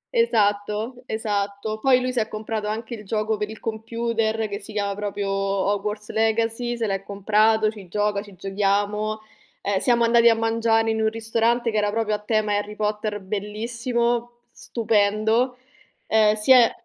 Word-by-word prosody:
Esatto, 215 - +1
esatto. 210 0 -2
Poi 255 +1 +4
lui 255 0 -2
si 245 - +1
è 215 - 0
comprato 215 0 -4
anche 225 +2 -4
il 210 -2 -7
gioco 215 +1 -1
per 210 0 -3
il 220 - -9
computer 225 0 -2
che 200 0 -5
si 210 +2 -11
chiama 200 -1 -1
proprio 205 0 -3
Hogwarts 200 +2 -1
Legacy, 225 +2 0
se 230 - -1
l'è 195 -1 -1
comprato, 215 +2 +2
ci 200 -4 -12
gioca, 205 +2 0
ci 205 -2 -13
giochiamo. 205 +3 -1 0.4
Ehm, 200 -1 0
siamo 240 -2 +3
andati 235 0 +6
a 225 - +4
mangiare 225 0 +1
in 220 0 -1
un 220 - +3
ristorante 230 +1 0
che 215 - -1
era 210 0 +2
proprio 215 0 -1
a 210 - -1
tema 215 0 0
Harry 205 +1 -3
Potter 210 -1 -2
bellissimo, 235 +4 -2 0.2
stupendo. 220 +2 +1 0.5
Ehm, 215 -1 +4
sia 240 +2 +6
215 Hz, 160 wpm, -23 LUFS, 205-230 Hz, 0.5 s, andati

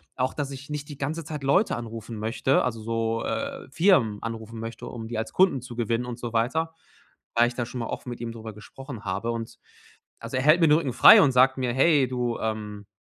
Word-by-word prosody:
auch 130 +1 -1
dass 145 -2 -3
ich 135 0 -9
nicht 150 0 -5
die 145 - -8
ganze 155 +4 -3
Zeit 150 -2 -7
Leute 160 +10 +2
anrufen 115 -1 -7
möchte 115 +5 +1
also 115 -3 -3
so, 115 0 -1
äh, 275 - -4
Firmen 140 - +3
anrufen 115 0 -6
möchte, 115 0 -7
um 115 -1 -7
die 115 -1 -5
als 110 0 -4
Kunden 180 -9 +3
zu 125 0 -9
gewinnen 115 +1 -1
und 120 -1 -6
so 120 -1 -6
weiter, 155 +9 0 0.6
weil 120 +1 +4
ich - - -9
da 120 - -2
schon 125 - -6
mal - - -3
offen - - -6
mit 120 - -6
ihm 115 -1 -4
drüber 115 -1 -8
gesprochen 115 +2 -10
habe. 100 +4 -2
Und 115 -1 -6 0.6
also - - -6
er - - +1
hält 155 +4 +6
mir - - +6
'n - - +3
Rücken 145 -6 -1
frei - - +9
und 140 - +4
sagt 130 +1 +4
mir: 125 -2 0
„Hey, 140 0 +4
du, 125 -2 -2
ähm, 105 -2 -4
120 Hz, 230 wpm, -25 LUFS, 115-140 Hz, 0.6 s, frei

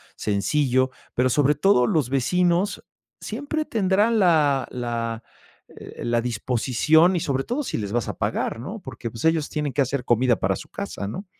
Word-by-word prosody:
sencillo, 130 +5 +1 0.2
pero 130 +1 +2
sobre 145 +3 +3
todo 160 -11 +3
los 145 -4 +1
vecinos 175 - +1 0.4
siempre 290 +7 -3
tendrán 215 +1 +2
la 150 -8 +3
la, 115 -2 -3 0.5
eh, - - -10
la 120 0 +1
disposición 125 - +2
y - - +1
sobre 135 -2 -1
todo 255 - -2
si - - -3
les 100 -2 -4
vas 120 -2 0
a - - -5
pagar, - - -2
¿no? 190 - -6
Porque, 120 -5 -7
pues, 115 +4 -6
ellos 160 -2 +2
tienen 150 -3 -3
que 145 - +1
hacer 135 -1 -1
comida 120 +1 +3
para - - 0
su - - -10
casa, 100 - -5
¿no? 185 - -6
135 Hz, 175 wpm, -23 LUFS, 120-175 Hz, 0.5 s, sobre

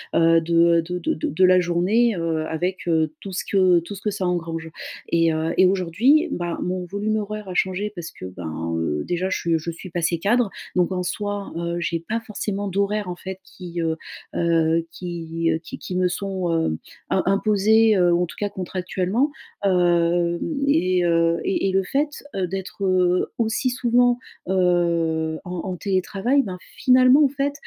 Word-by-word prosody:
heu, 165 0 +5
de, 165 +1 -3 0.3
heu - - +2
de 180 +2 -4
de - - -1
de - - -3
de 175 +6 +1
la 185 0 +6
journée, 190 +7 +2
heu, 165 -2 -1
avec, 180 +3 -3
heu, 160 -2 +1
tout 195 - -8
ce - - -2
que 185 -3 +4
tout 185 +5 -8
ce 195 - -10
que 210 - -1
ça 195 -2 -3
engrange. 165 -2 -2 0.4
Et 165 -1 +3
heu, 160 +1 -1
et 185 - +6
aujourd'hui, 195 - +3
ben, 175 -1 -3
mon 180 0 -2
volume 210 +4 -1
horaire 210 -1 -5
a - - -4
changé, 190 +3 0
parce 170 -1 -6
que, - - -10
ben, 80 -2 -5
heu, 75 -2 -1
déjà 180 +2 -1
je - - 0
suis, 170 - -1
heu, 165 - +4
je 170 +2 -4
suis 175 +3 -10
passée 170 0 0
cadre. 225 +3 +2 0.3
Donc, 180 0 +2
en 180 -1 -1
soi, 205 +2 -3
heu, 170 0 -2
j'ai 170 -1 -1
pas 220 +7 -3
forcément 205 -3 -4
d'horaires 200 +1 -1
en 180 - -4
fait 190 +1 -7
qui, 175 -2 -7
heu 160 -1 0 0.4
heu, 165 -1 +2
qui, 165 -2 -3
heu, 160 - +1
qui - - -8
qui 180 - -6
me 185 0 +2
sont, 190 -1 -2
heu, 160 - 0 0.3
im - - +1
imposés, 215 +2 +4
heu, 175 -1 +4
en 175 +1 +2
tout 170 - -11
cas 205 -1 -1
contractuellement. 190 +8 -1 0.3
Hem, 175 -2 +2 0.3
et, 185 - +2
heu 165 0 +2
et 195 0 0
et - - 0
le 190 0 +2
fait, 290 +8 -2
heu, 185 -2 0
d'être, 195 +2 -5
heu, 180 -1 +2
aussi 235 +3 0
souvent, 245 0 +2 0.3
heu, 170 -3 +1
en 180 - -7 0.2
en - - -3
télétravail, 195 +8 +1
ben, 185 -2 -6 0.2
finalement, 255 +3 +6
en 275 - +2
fait, 280 +1 -1
180 Hz, 195 wpm, -23 LUFS, 170-200 Hz, 0.4 s, la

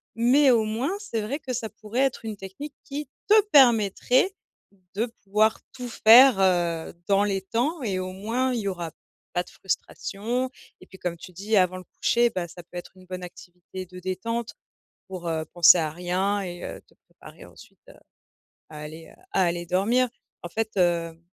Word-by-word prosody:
mais 260 +4 +5
au 225 -3 +3
moins 225 +8 -1
c'est 405 - -3
vrai 250 +8 -3
que 260 -4 -5
ça 230 -2 -3
pourrait 220 +3 -3
être 270 -4 0
une 220 -1 -4
technique 200 +10 -9
qui 290 +1 -6 0.2
te 430 +1 +8
permettrait 250 - +4 0.6
de 215 +4 0 0.2
pouvoir 210 +2 +2
tout 250 -1 -7
faire, 235 -1 +7
heu, 175 -3 +1
dans 200 0 +4
les 195 -2 0
temps 245 - -1
et 195 -5 -1
au 185 0 -4
moins 230 +7 -1
y'aura 190 -7 -3 0.4
pas 175 - 0
de - - -17
frustration 225 +6 -3 0.3
et - - -13
puis 190 - -14
comme 175 -2 -3
tu 175 +2 -12
dis 200 +5 -2
avant 185 -2 +3
le 185 - -9 0.2
coucher 240 0 +3
bah 175 -2 -3
ça 175 - -11
peut 175 - -18
être 175 - -8
une 185 - -16
bonne 185 0 -7
activité 180 +1 -10
de 180 0 -13
détente. 230 +6 -3 0.5
Pour, 185 -2 -7
heu, 160 -1 -1
penser 175 0 +8
à 160 -2 0
rien 180 +5 -1
et 175 -2 -6
heu, - - -7
te - - -27
préparer - - -15
ensuite - - -17
à - - -13 0.8
à 150 -1 -9
aller, 155 +2 -9
heu, - - -23
à 190 - +3
aller 175 0 -1
dormir 225 +8 +2 0.3
en 175 - -7
fait, 220 +1 -3
heu, 170 -2 +1
195 Hz, 185 wpm, -25 LUFS, 180-235 Hz, 0.8 s, te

